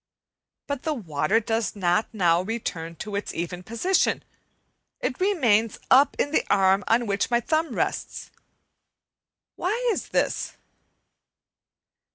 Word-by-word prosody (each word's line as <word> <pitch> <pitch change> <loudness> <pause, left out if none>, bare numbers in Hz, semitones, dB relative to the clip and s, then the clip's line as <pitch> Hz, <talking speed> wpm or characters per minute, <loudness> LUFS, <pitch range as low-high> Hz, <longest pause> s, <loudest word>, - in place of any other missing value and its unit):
But 285 -3 -3
the 315 -2 -1
water 170 - 0
does 225 0 -2
not 185 +2 +1
now 175 -6 +3
return 180 -6 -4
to 205 +5 -6
its 200 - -4
even 175 +1 -4
position, 230 - +1 0.8
it - - -3
remains 240 - +2
up 270 +3 +6
in 285 - 0
the - - +2
arm 195 0 +4
on 235 +2 +3
which 200 +2 0
my 240 -1 +3
thumb 315 +7 -1
rests. - - -3 1.3
Why 365 +4 0 0.2
is - - -4
this? - - -1
220 Hz, 125 wpm, -25 LUFS, 185-260 Hz, 1.3 s, up